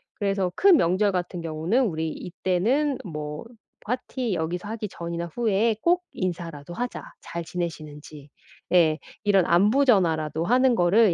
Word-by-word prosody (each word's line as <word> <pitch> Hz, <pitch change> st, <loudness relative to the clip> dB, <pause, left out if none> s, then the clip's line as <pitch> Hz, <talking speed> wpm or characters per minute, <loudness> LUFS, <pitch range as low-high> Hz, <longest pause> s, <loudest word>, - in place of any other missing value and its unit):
그래서 195 Hz, -3 st, -1 dB
큰 390 Hz, -4 st, +6 dB
명절 195 Hz, -1 st, +2 dB
같은 180 Hz, -1 st, -3 dB
경우는 165 Hz, +10 st, 0 dB
"우리 160 Hz, -5 st, -2 dB
이때는 205 Hz, -, 0 dB
뭐 150 Hz, -2 st, -6 dB, 0.4 s
파티 250 Hz, 0 st, -2 dB
여기서 175 Hz, +3 st, -3 dB
하기 220 Hz, -1 st, -4 dB
전이나 170 Hz, -1 st, -5 dB
후에 225 Hz, -1 st, +1 dB
꼭 355 Hz, +1 st, +2 dB
인사라도 170 Hz, -4 st, -4 dB
하자 245 Hz, +7 st, -4 dB, 0.2 s
잘 170 Hz, 0 st, -6 dB
지내시는지." 155 Hz, -4 st, -6 dB, 0.4 s
예. 160 Hz, -4 st, +5 dB, 0.3 s
이런 195 Hz, -4 st, +4 dB
안부 210 Hz, +11 st, +4 dB
전화라도 165 Hz, -, +2 dB
하는 250 Hz, +6 st, +3 dB
거를 195 Hz, +2 st, +4 dB
180 Hz, 295 characters per minute, -25 LUFS, 165-225 Hz, 0.4 s, 큰